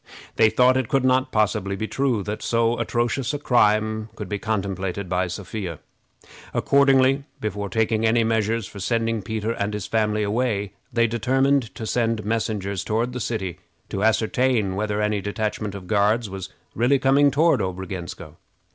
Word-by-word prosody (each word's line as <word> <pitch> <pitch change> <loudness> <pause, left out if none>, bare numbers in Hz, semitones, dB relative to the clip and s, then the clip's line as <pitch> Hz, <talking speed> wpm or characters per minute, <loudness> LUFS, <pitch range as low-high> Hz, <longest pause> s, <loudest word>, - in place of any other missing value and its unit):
They 110 -1 +5
thought 125 +3 +4
it 130 -3 0
could 135 -1 +2
not 130 +1 +2
possibly 100 -2 0
be 110 +3 -3
true 130 -6 0
that 105 +2 -4
so 115 0 +1
atrocious 120 +3 -1
a - - -1
crime 110 -4 +2
could 105 - -6
be 100 +2 -3
contemplated 100 -3 -2
by 90 +1 0
Sophia. 95 -2 -5 0.8
Accordingly, 135 0 +4
before 105 -1 -3
taking 110 +2 +1
any 115 +1 +3
measures 110 0 0
for 100 - -10
sending 115 +2 0
Peter 110 +2 -3
and 105 -2 -2
his 105 -3 -4
family 105 -1 0
away, 105 -2 -1 0.2
they 115 -1 +3
determined 130 +3 +1
to 110 - -5
send 115 -2 0
messengers 105 -3 -2
toward 115 +3 -1
the 125 - -4
city 95 -7 -3 0.3
to 100 - -2
ascertain 110 -2 +2
whether 105 +1 -1
any 105 -1 0
detachment 105 0 -3
of 95 -2 -8
Guards 105 +3 +1
was 95 -1 -6 0.2
really 125 +5 +3
coming 135 +2 +4
toward 150 -1 +3
Obrogensko. 95 -3 -6
110 Hz, 160 wpm, -23 LUFS, 100-120 Hz, 0.8 s, They